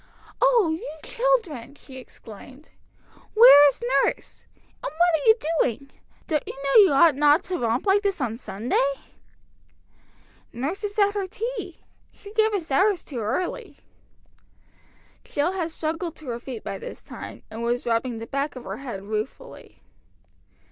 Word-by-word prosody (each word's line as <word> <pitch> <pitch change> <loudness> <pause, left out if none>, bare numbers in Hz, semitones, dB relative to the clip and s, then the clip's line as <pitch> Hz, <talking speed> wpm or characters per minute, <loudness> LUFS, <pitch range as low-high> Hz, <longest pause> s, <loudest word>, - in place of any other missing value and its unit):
"Oh, 480 -9 +4
you 320 - -7
children!" 415 - -1
she 265 -2 -13
exclaimed. 255 +3 -13 0.6
"Where 360 -11 +9
is 285 - -1 0.2
nurse? - - -4 0.4
And - - -3
what - - -18 0.2
are 320 +4 0
you 440 - +8 0.3
doing? 265 +3 -2 0.3
Don't 305 -3 0
you - - -5
know 275 +9 +5
you 390 - +5
ought 305 +3 +5
not 295 +2 +4
to 370 -2 -4
romp 235 - -1
like 400 +1 +3
this 395 -3 -1
on 240 -5 -2
Sunday?" 240 +5 -1 1.6
"Nurse 290 - -4
is 415 0 -4
at 405 -1 +3
her 400 -2 -2
tea. 420 -3 -6 0.3
She 405 0 -14
gave 440 0 +3
us 360 -8 -4
ours 385 +5 +2
too 260 -5 -7
early." 355 - -3 1.5
Jill 295 +5 -1
had 355 -4 -3
struggled 325 +1 -4
to 300 -5 -9
her 235 0 -4
feet 240 -2 -8
by 195 - -5
this - - -9
time, - - -10
and 225 +1 -7
was 240 +1 -1
rubbing 235 +1 -1
the 225 - -6
back 275 +4 -3
of 255 - -8
her - - -6
head 240 -8 -7
ruefully. 215 - -7
295 Hz, 155 wpm, -24 LUFS, 245-390 Hz, 1.6 s, Where